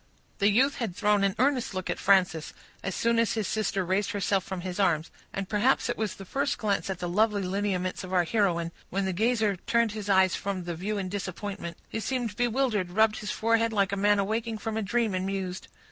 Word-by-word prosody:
The 200 0 +4
youth 260 +7 +3
had 225 -9 -3
thrown 210 -1 +2
an 195 -1 +1
earnest 255 -6 +1
look 185 0 -3
at - - -2
Frances, 185 -5 +2 0.3
as 195 - -3
soon 235 0 +2
as 230 - +2
his 220 -3 -1
sister 200 -3 -1
raised 190 +3 0
herself 195 -1 +1
from 190 -2 -5
his 180 0 -5
arms, 170 -5 +2 0.2
and 195 -1 -4
perhaps 230 +6 +2
it 240 - 0
was 220 -2 -2
the 195 - -10
first 275 +8 -1
glance 205 -2 -1
at 190 - -2
the 175 - -4
lovely 205 +2 +2
lineaments 185 -1 -1
of 185 - -7
our 180 -2 +3
heroine, 170 -4 +1 0.2
when 195 +1 -1
the 190 - -1
gazer 220 0 +1
turned 235 +4 +1
his 210 -1 -6
eyes 190 -2 +5
from 195 -2 -3
the 175 0 -4
view 200 +6 -3
in 195 -2 -2
disappointment. 190 -2 -5
He 225 - -4
seemed 240 -2 -2
bewildered, 240 -5 +1
rubbed 215 +3 +3
his 210 - -5
forehead 230 +1 +2
like 200 -3 +1
a - - 0
man 205 +1 +3
awaking 220 +3 -1
from 215 +1 -4
a 220 - 0
dream, 225 0 0
and 185 0 -1
mused. 190 -1 -3
200 Hz, 220 wpm, -28 LUFS, 185-220 Hz, 0.3 s, eyes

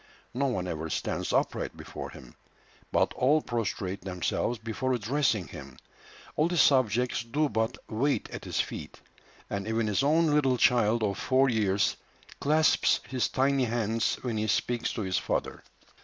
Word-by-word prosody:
No 140 +3 +1
one 95 -8 -2
ever 80 -1 -4
stands - - -2
upright - - -1
before - - -7
him, 60 -2 -13 0.6
but - - +2
all 145 +5 +3
prostrate 105 -7 -3
themselves 95 +6 -2
before 115 +4 -2
addressing 120 -4 0
him. - - -10 0.6
All 155 +3 +2
his 175 -4 +3
subjects 125 -2 +3
do 145 +6 0
but 110 -2 -1
"wait 135 +6 0
at - - -7
his - - -2
feet," - - -4 0.5
and 100 +1 -4
even 110 0 0
his 105 +3 +1
own 155 +4 +3
little 135 -4 +3
child 115 -2 +3
of 100 -2 -1
four 135 +1 +3
years 100 -4 +1 0.4
clasps 155 +2 +3
his 130 -2 0
tiny 135 0 +2
hands 115 -1 0
when 120 -4 -2
he 110 0 -1
speaks 120 +2 0
to - - -3
his 95 -1 0
father. - - -2
120 Hz, 155 wpm, -28 LUFS, 105-135 Hz, 0.6 s, all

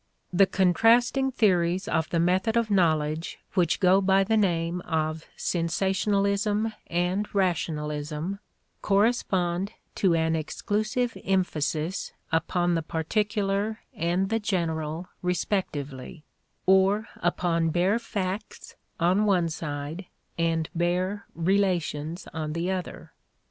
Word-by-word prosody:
The 195 +2 +5
contrasting 230 +9 +3
theories 185 -5 +2
of 160 -1 0
the 170 - 0
method 185 +6 +2
of 230 -2 +1
knowledge 160 -4 +1 0.2
which 175 -4 +2
go 190 0 +5
by 195 0 +4
the 220 +3 +1
name 175 -4 +1
of 155 -2 -2
sensationalism 200 +5 0
and 180 +4 0
rationalism 155 -1 -1 0.4
correspond 195 -3 +1 0.2
to 185 -4 +2
an 160 0 +1
exclusive 215 +9 -1
emphasis 170 -2 -1 0.2
upon 175 +2 +1
the 165 - +1
particular 205 +6 -1
and 175 +4 0
the 225 +1 +1
general 170 -5 -2
respectively 155 -6 -3 0.4
or 190 +3 +4
upon 170 -1 +1
bare 180 +7 +2
facts 200 -3 -5 0.3
on 185 +5 +3
one 180 -4 +3
side 155 +2 -5 0.3
and 165 -1 0
bare 180 +4 -1
relations 170 -3 0
on 155 -1 -3
the 170 +3 -1
other. 185 -2 -5
180 Hz, 105 wpm, -26 LUFS, 165-200 Hz, 0.4 s, The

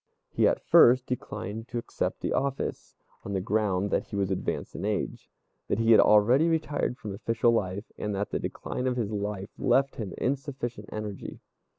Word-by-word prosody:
He - - +3
at - - 0
first 125 +1 +6
declined 115 -3 -5
to 120 - -5
accept 120 - -3
the - - -1
office, 140 0 -2 0.3
on 100 - -5
the 95 - +1
ground 100 0 0
that - - +1
he - - -7
was 100 -1 0
advanced 95 - -3
in - - -5
age, - - -2 0.4
that - - 0
he 115 0 +3
had 110 - +8
already 120 +9 +5
retired 150 -5 -1
from 105 -2 -6
official 115 +3 +1
life, 100 -2 -2
and 105 -1 -2
that 100 +1 -2
the - - -1
decline 125 - -4
of 125 -1 0
his 110 -3 -1
life 100 -1 -3
left 135 +1 +2
him 105 -5 -5
insufficient 130 -5 -3
energy. 105 -2 -6
110 Hz, 185 wpm, -28 LUFS, 100-125 Hz, 0.4 s, had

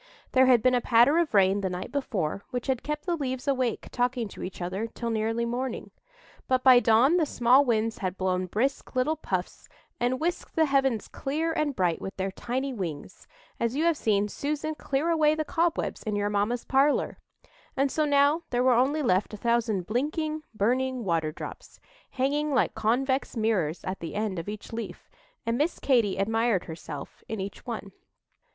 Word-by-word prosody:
There 260 0 +5
had 245 -4 +5
been 255 0 +4
a 245 - +2
patter 245 +8 +5
of 340 -3 +1
rain 195 0 +4
the 190 - -1
night 180 +1 -5
before, 200 - -2
which 245 -1 -4
had 260 -3 0
kept 300 0 -4
the 350 -2 0
leaves 260 -4 -4
awake 255 -4 0
talking 245 -1 0
to - - -10
each 185 - -6
other 185 +5 -3
till 230 0 -4
nearly 225 +1 0
morning; 250 +2 -3 0.6
but 255 -1 +1
by 255 -2 +8
dawn 245 +8 +4
the 330 - +3
small 250 +3 +4
winds 225 -3 0
had 185 -1 -3
blown 185 -1 0
brisk 255 +9 -2
little 255 +5 +2
puffs, 185 - -4 0.3
and 250 +1 0
whisked 345 +2 -3
the 320 - +4
heavens 270 -6 +1
clear 315 +4 -2
and 305 -4 -1
bright 175 -3 0
with 195 - -6
their 190 0 -2
tiny 260 +6 -3
wings, 180 -5 -6 0.3
as 235 +2 0
you 305 - +1
have 335 -1 +3
seen 210 -6 +1
Susan 300 +7 -3
clear 295 +1 -1
away 310 -2 +3
the 310 0 -2
cobwebs 335 +2 0
in 215 -1 -3
your 205 0 0
mamma's 210 +4 0
parlour; 275 +2 +2 0.6
and 275 0 +2
so 310 - +1
now 290 +2 +3
there 245 0 +1
were 255 -1 +5
only 275 +6 +2
left 200 -2 +1
a - - -9
thousand 230 -4 0
blinking, 305 - -1
burning 255 +4 0
water 165 -5 0
drops, - - -9 0.3
hanging 290 +3 0
like - - +2
convex 255 +4 0
mirrors 195 -8 0
at 185 +1 -4
the 165 - -6
end 205 -4 -1
of 165 - -6
each 210 +1 -8
leaf, 230 0 -7 0.3
and 230 +1 0
Miss 310 +4 +1
Katy 235 -8 +2
admired 225 0 +1
herself 160 -3 -8
in 220 - -4
each 195 +5 -7
one. 220 -4 -5
240 Hz, 185 wpm, -27 LUFS, 205-275 Hz, 0.6 s, by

